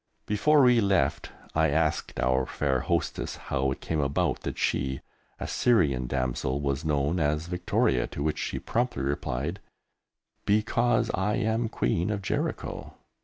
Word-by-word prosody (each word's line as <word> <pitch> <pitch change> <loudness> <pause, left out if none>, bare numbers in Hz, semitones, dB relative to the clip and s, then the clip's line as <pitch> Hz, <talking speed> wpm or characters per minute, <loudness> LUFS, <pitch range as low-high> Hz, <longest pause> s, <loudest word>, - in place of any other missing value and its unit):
Before 145 +8 +4
we 125 -2 +5
left, 100 -2 +1 0.2
I 80 0 +3
asked 80 +1 0
our 65 +1 +2
fair 70 -3 0
hostess - - -1
how 65 -1 -1
it - - -5
came 80 - -2
about 70 0 0
that - - -5
she, 65 0 -1 0.4
a - - -4
Syrian 70 - +2
damsel, 65 +1 -1
was 70 +1 -1
known 75 +2 +1
as 75 +1 0
Victoria, 85 -7 +1
to 70 - -5
which 75 0 -1
she - - -2
promptly 120 - -1
replied, 70 +5 -2 0.8
"Because 115 +3 +2
I 105 +3 0
am 110 -1 0
Queen 85 - 0
of 105 -2 -2
Jericho." - - -3
80 Hz, 145 wpm, -27 LUFS, 70-105 Hz, 0.8 s, we